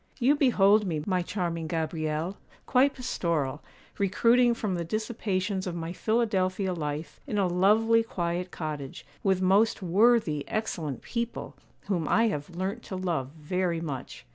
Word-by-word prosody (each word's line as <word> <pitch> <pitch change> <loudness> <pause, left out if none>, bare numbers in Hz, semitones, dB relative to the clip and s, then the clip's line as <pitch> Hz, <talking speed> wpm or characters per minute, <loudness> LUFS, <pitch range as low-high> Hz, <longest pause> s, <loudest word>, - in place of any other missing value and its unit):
'You 265 +2 +4
behold 215 -7 +4
me, 155 -4 -2
my 185 -2 +1
charming 170 -3 -3
Gabrielle, 160 +2 -2 0.3
quite 270 +2 +3
pastoral; 165 - -1 0.4
recruiting 235 +5 +4
from 210 -4 -2
the 175 -1 -2
dissipations 200 -1 -2
of 175 - -3
my 165 0 -4
Philadelphia 195 -4 0
life 150 -2 -4
in 210 - -2
a 200 - +3
lovely, 210 +6 +4
quiet 180 -4 -3
cottage, 150 -5 -6 0.2
with 190 -2 +1
most 200 +3 +3
worthy, 185 -5 +3
excellent 170 - -3
people, 235 0 -4 0.3
whom 175 -6 -2
I 230 +1 +3
have 150 -5 -4
learnt 195 +6 -3
to 190 - -5
love 170 -8 -2
very 175 +2 -1
much. 145 -6 -6
185 Hz, 140 wpm, -28 LUFS, 165-215 Hz, 0.4 s, You